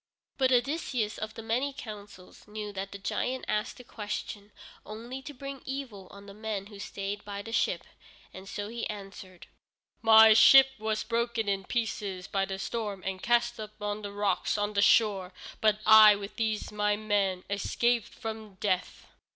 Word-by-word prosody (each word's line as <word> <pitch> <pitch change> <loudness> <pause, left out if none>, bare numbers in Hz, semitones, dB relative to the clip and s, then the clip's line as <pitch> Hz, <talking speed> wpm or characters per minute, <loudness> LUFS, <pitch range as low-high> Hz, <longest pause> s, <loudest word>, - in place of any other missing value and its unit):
But 260 -1 +3
Odysseus 250 -4 0
of 215 0 -5
the 225 - -8
many 250 +5 -1
counsels 205 -7 -11
knew 210 -1 -6
that 195 0 -5
the 200 - -7
giant 255 +6 -3
asked 210 0 -2
the 250 - -11
question 210 -2 -6 0.3
only 235 +5 -8
to 290 - -8
bring 275 0 -8
evil 260 -8 -6
on 200 0 -13
the 200 - -11
men 210 -2 -4
who 200 - -10
stayed 200 +1 -5
by 200 0 -6
the 225 - -8
ship, - - 0 0.5
and 190 +1 -10
so 205 0 -4
he 230 +1 -5
answered: 195 -3 -9 0.6
"My 220 -1 +8
ship 270 +5 +8
was 215 0 -1
broken 235 -1 -1
in 195 -1 -1
pieces 205 -6 -3
by 195 -1 0
the 190 0 -5
storm 205 -2 -4
and 190 -1 -3
cast 240 0 +1
up 215 0 -9
on 205 0 -3
the 205 -1 -6
rocks 200 0 0
on 205 0 -1
the 200 - +2
shore, 200 -4 +3 0.3
but 215 -1 +3
I, 215 -1 +9
with 200 0 -8
these 220 -2 -2
my 210 0 +1
men, 205 -3 0
escaped 235 +3 0
from 220 -3 -7
death." 185 -2 -2
210 Hz, 175 wpm, -29 LUFS, 200-230 Hz, 0.6 s, I